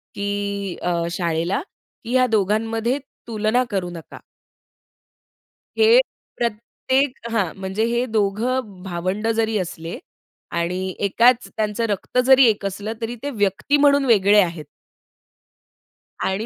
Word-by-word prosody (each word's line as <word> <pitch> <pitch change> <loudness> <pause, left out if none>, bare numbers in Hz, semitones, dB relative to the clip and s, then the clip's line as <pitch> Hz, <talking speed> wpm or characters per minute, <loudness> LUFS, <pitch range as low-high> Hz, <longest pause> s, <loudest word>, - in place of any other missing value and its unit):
की 200 -1 -3
अ, 180 - 0 0.2
शाळेला, 170 - -1 0.4
की 235 - -6
ह्या 255 0 +4
दोघांमध्ये 225 +5 0 0.3
तुलना 220 +2 +1
करू 190 -4 -2
नका. 170 -2 -10 1.6
हे 450 +2 +6 0.4
प्रत्येक 235 +2 -1
हां, 200 -7 0
म्हणजे 190 +3 -2
हे 240 +1 0
दोघं 215 -1 -1
भावंड 185 +4 -2
जरी 220 -1 +1
असले 170 -2 -5 0.6
आणि 180 +2 -2
एकाच 240 +5 +3
त्यांचं 215 +1 -1
रक्त 205 +4 -3
जरी 265 0 +7
एक 210 -2 -1
असलं, 200 +3 -4
तरी 230 +1 -3
ते 285 - -2
व्यक्ती 205 +6 +1
म्हणून 285 -1 +4
वेगळे 210 -3 +5
आहेत. 170 -4 -3 1.6
आणि 195 +4 -2
210 Hz, 115 wpm, -22 LUFS, 190-235 Hz, 1.6 s, जरी